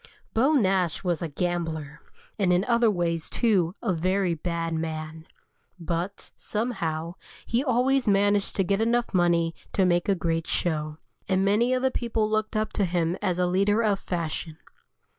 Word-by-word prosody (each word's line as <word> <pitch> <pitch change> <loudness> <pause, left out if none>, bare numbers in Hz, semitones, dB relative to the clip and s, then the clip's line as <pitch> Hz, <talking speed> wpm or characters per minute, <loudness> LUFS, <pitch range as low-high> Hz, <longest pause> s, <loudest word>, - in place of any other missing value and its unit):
Beau 265 +7 +3
Nash 190 - +1
was 175 -2 -1
a 170 - -2
gambler, 160 -2 -3 0.4
and 190 -3 +3
in 180 +1 +3
other 235 0 +3
ways, 170 -4 -1
too, 190 -7 +1
a 200 -6 +1
very 185 +2 +1
bad 165 0 -3
man. 160 0 -5 0.5
But, 170 +3 -4
somehow, 170 -8 -3 0.3
he 235 +3 0
always 260 0 +2
managed 205 0 +2
to 195 - +2
get 195 +3 0
enough 235 +1 +1
money 170 -2 +2 0.2
to 190 - +3
make 175 +1 +1
a 200 - +4
great 165 -2 -1
show, 155 -3 -1 0.3
and 190 0 +2
many 215 +5 +3
of 255 0 +1
the 265 - +2
people 225 -3 -1
looked 215 0 -1
up 215 0 -1
to 200 - +1
him 170 -1 0
as 180 -2 0
a 180 - +2
leader 200 +5 +2
of 205 -3 +1
fashion. 165 -2 -4
185 Hz, 165 wpm, -26 LUFS, 165-215 Hz, 0.5 s, a